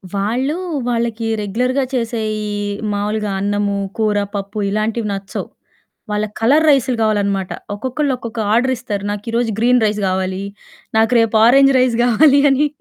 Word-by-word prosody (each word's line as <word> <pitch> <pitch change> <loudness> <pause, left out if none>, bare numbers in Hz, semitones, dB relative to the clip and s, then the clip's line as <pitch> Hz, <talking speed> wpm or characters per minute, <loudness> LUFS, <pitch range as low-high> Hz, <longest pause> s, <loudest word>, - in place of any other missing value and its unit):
వాళ్ళు 240 +9 -1 0.3
వాళ్ళకి 230 -1 -1
రెగ్యులర్‌గా 250 +7 0
చేసే 235 -2 -1 0.3
ఈ - - -4 0.4
మావులుగా 210 +1 -2
అన్నము, 205 0 0 0.2
కూర, 215 -2 +1 0.2
పప్పు, 200 +1 -5
ఇలాంటివి 215 +2 -1
నచ్చవు. 195 0 -5 0.6
వాళ్ళకి 210 0 -2
కలర్ 290 +8 +4
రైసులు 260 -4 +2
గావాలనమాట. 200 -3 0 0.3
ఒక్కొక్కళ్ళు 260 +6 -1
ఒక్కొక్క 230 -1 -7
ఆర్డరిస్తారు. 240 -4 0
నాకీ 210 +2 -5
రోజు 235 -2 0
గ్రీన్ 245 0 +3
రైస్ 210 0 -1
గావాలి. 185 +1 -2 0.5
నాకు 225 +1 +3
రేపు 225 -1 +1
ఆరంజ్ 275 +3 +6
రైస్ 250 -2 +2
గావాలి 275 +4 +5
అని. 285 +3 +2
225 Hz, 135 wpm, -18 LUFS, 205-250 Hz, 0.6 s, ఆరంజ్